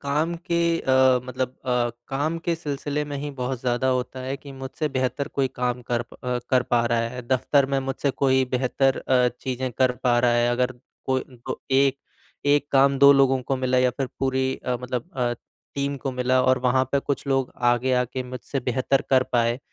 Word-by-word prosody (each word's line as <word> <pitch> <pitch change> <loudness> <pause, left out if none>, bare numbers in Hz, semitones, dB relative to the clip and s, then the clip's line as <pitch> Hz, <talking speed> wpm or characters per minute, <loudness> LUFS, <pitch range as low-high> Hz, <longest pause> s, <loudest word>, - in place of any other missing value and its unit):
काम 150 +4 0 0.2
के 170 - +2 0.2
अ, 130 -1 +4
मतलब 130 0 -3
अ, 125 -2 +1 0.2
काम 145 +5 -1
के 170 0 -1
सिलसिले 150 -2 -3
में 145 -1 -5
ही 145 +1 -4
बहुत 125 0 -2
ज़्यादा 125 +1 0
होता 130 0 -1
है 130 +2 -3
कि 140 0 -12
मुझसे 135 +3 -4
बेहतर 130 +2 -1
कोई 135 -1 +3
काम 125 0 -1
कर 120 -1 +1
प 115 - -18
अ, 125 0 0
कर 130 -1 +4
पा 120 -1 +1
रहा 120 -1 +1
है, 125 +1 -7
दफ़्तर 135 +2 +2
में 135 0 0
मुझसे 135 +1 -1
कोई 130 -1 +2
बेहतर 130 +1 +1
अ, 125 -1 +2
चीज़ें 130 0 -3
कर 130 +1 +2
पा 120 -1 +4
रहा 120 0 +3
है। 120 0 +2
अगर 125 +1 0 0.3
कोई 130 0 +1 0.2
को - - -4
ए 135 0 +4 0.5
एक 145 0 +3
काम 140 0 +4
2 140 0 +8
लोगों 135 -1 +3
को 135 +2 -1
मिला 130 0 +1
या 125 0 +3
फिर 130 +1 -3
पूरी 130 0 0
अ, 125 -1 0
मतलब 125 +6 -4
अ, 120 -1 +1 0.4
टीम 140 0 -1
को 135 - -1
मिला 125 0 +2
और 130 0 +3
वहाँ 130 +1 +3
पर 140 - +3
कुछ 140 0 -3
लोग 135 -1 0
आगे 120 +2 +2
आकर 125 +1 -5
मुझसे 125 +2 -5
बेहतर 130 +2 0
कर 130 -1 +5
पाएँ। 120 0 +2
130 Hz, 205 wpm, -24 LUFS, 125-135 Hz, 0.5 s, 2